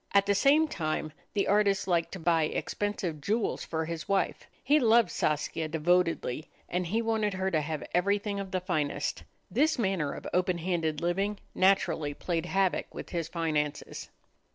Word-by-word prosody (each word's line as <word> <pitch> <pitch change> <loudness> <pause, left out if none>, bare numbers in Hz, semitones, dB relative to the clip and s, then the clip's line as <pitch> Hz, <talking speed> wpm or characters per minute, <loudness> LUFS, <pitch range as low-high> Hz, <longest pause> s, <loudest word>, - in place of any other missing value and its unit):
At 200 0 +6
the 200 - +3
same 285 +9 +4
time, 155 - -3 0.2
the 200 - +1
artist 200 -1 +2
liked 170 -2 +1
to 190 - -5
buy 165 -1 +3
expensive 180 -3 -3
jewels 215 +8 0
for 160 -1 -2
his 165 +1 -5
wife. 195 -1 0 0.2
He 290 +4 +4
loved 230 -5 +4
Saskia 155 +1 -1
devotedly, 165 -3 +1 0.2
and 180 0 -1
he 225 +6 0
wanted 220 -3 0
her 190 0 -1
to 155 -3 +2
have 150 0 -4
everything 200 +3 +1
of 195 -1 -5
the 185 -1 -1
finest. 155 -6 -1 0.3
This 315 +2 +2
manner 190 - 0
of - - -9
open 180 0 +2
handed 165 -3 -1
living 195 +4 0 0.2
naturally 170 -6 +2
played 170 -1 -2
havoc 190 -1 +1
with - - -7
his 170 -2 -2
finances. 155 -3 -2
180 Hz, 165 wpm, -29 LUFS, 160-200 Hz, 0.3 s, At